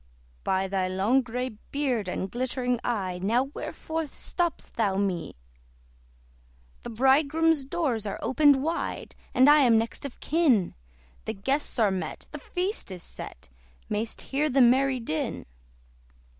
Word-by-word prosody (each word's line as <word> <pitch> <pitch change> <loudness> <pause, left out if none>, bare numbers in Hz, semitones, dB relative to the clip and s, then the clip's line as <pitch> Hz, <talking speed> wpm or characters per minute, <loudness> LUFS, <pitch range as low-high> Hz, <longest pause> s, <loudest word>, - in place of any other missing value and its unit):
"By 190 0 +1
thy 190 -1 0
long 195 +8 +2
grey 250 +1 -3 0.2
beard 260 -8 0
and 190 +1 -3
glittering 250 0 -1
eye, 190 -7 -2
Now 230 +6 +2
wherefore 320 0 -4
stopp'st 345 +4 -3
thou 205 -4 +1
me? 190 -4 -1 1.5
"The - - -7
Bridegroom's 280 +5 +3
doors 265 -8 -1
are 200 - -3
opened 270 +3 +4
wide, 330 +2 -3 0.2
And 255 +2 +6
I 295 +1 +8
am 240 -5 +5
next 225 +1 -2
of 280 -3 -7
kin; 280 - +2 0.5
The 220 - -3
guests 270 +10 -1
are 215 -4 +3
met, 190 -1 -4
the - - -6
feast 370 - -3
is 185 -2 -7
set: - - -8 0.4
May'st 215 +2 -2
hear 295 +3 +1
the 270 0 +2
merry 260 +1 +4
din." 160 -9 -3
245 Hz, 140 wpm, -27 LUFS, 205-280 Hz, 1.5 s, I